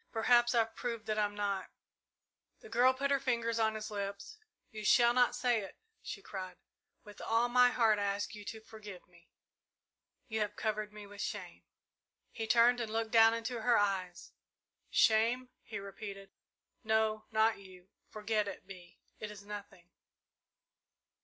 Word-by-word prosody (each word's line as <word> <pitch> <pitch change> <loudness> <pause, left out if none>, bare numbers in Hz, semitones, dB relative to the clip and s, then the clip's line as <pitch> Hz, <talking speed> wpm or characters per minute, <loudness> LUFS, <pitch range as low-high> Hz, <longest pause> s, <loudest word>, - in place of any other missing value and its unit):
Perhaps 240 +1 +3
I've 225 -1 +2
proved 230 -3 -4
that 215 0 -1
I'm 205 -1 0
not 200 -2 -2 0.5
" - - -53
The 445 - -13
girl 255 - +5
put 280 +2 -2
her 280 - +3
fingers 235 -3 -1
on 220 -1 +2
his 215 0 -6
lips. 200 - -5 0.3
"You 215 -2 -7
shall 235 +3 +5
not 245 0 +3
say 245 -2 +1
it!" 195 - -10 0.2
she 200 - -7
cried. 185 -2 -7 0.5
"With 210 0 -13
all 230 +2 +1
my 250 0 +6
heart 225 -4 +3
I 205 - 0
ask 200 +5 -2
you 210 -1 -9
to 220 +1 -7
forgive 210 -4 -11
me 175 -1 -23 1.0
you 220 -1 -2
have 210 -1 -2
covered 215 -1 -2
me 210 -1 -10
with 205 0 -9
shame." - - -6 0.7
He 225 -2 -5
turned 240 +2 +5
and 225 -2 -3
looked 225 0 -2
down 225 0 +6
into 230 +1 -4
her 240 +1 +4
eyes. 190 -3 -1 0.6
"Shame," 230 +3 +3
he 215 - -7
repeated; 195 0 -8 0.5
"no, 220 -1 +1
not 220 -1 +2
you. 185 -1 -15 0.2
Forget 215 0 -1
it, 200 - -7
Bee; 180 -3 -13 0.2
it 215 - -5
is 205 -1 -10
nothing. 200 -4 -10
220 Hz, 165 wpm, -33 LUFS, 205-230 Hz, 1.0 s, my